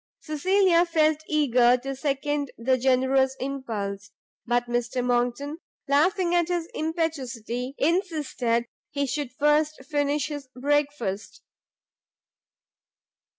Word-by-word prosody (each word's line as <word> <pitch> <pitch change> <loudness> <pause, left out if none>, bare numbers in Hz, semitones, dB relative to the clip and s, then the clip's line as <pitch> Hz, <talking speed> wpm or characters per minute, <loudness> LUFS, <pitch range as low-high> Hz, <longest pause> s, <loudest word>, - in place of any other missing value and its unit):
Cecilia 350 +3 +3
felt 315 -3 +2
eager 250 -5 +4
to 270 +2 -5
second 285 0 -1
the 255 +3 +2
generous 265 +1 +2
impulse; 215 -7 -4 0.4
but 240 0 +1
Mr 240 +1 -1
Monckton, 245 +5 0 0.3
laughing 345 +6 +2
at 345 -2 +3
his 350 -2 -1
impetuosity, 265 -6 -3
insisted 295 - 0 0.2
he 280 -1 -1
should 280 0 -3
first 295 +1 +1
finish 290 0 0
his 290 -3 -6
breakfast. 275 -7 -1
280 Hz, 100 wpm, -26 LUFS, 250-310 Hz, 0.4 s, eager